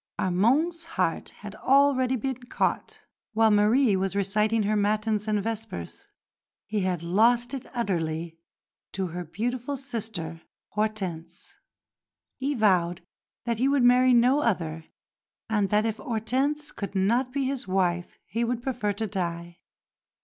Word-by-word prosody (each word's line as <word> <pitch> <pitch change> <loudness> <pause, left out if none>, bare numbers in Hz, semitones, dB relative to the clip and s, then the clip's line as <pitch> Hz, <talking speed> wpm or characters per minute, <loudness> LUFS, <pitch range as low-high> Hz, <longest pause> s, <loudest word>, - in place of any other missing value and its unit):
Armande's 265 - +2
heart - - 0
had - - -10
already 265 -1 +3
been 260 +1 -3
caught - - -2 0.3
while 220 0 +4
Marie 210 +2 +4
was 190 +1 -1
reciting 210 +3 +1
her 210 +1 +1
matins 210 +1 0
and 210 -2 +1
vespers: 225 - -6 0.6
He 210 0 -2
had 185 -3 -1
lost 230 +8 +3
it 270 - -5
utterly 165 -8 -2 0.5
to 190 -2 -2
her 175 +2 -5
beautiful 245 - -3
sister, 220 - -5 0.3
Hortense; 205 -6 -4 0.8
he 280 +2 -1
vowed 180 -6 +2 0.4
that 235 -2 -1
he 260 - +3
would 280 -2 +3
marry 250 +1 +6
no 250 +4 +4
other, 165 - -1 0.6
and 210 -3 +1
that 210 +2 +2
if 225 -1 -1
Hortense 270 +5 -1
could 200 -5 -6
not 235 +7 +2
be 275 +1 -1
his 265 -4 -2
wife 180 -2 0
he 230 +3 -2
would 240 0 -2
prefer 240 -6 -1
to 220 +2 -3
die. 170 -3 -4
215 Hz, 135 wpm, -26 LUFS, 190-250 Hz, 0.8 s, marry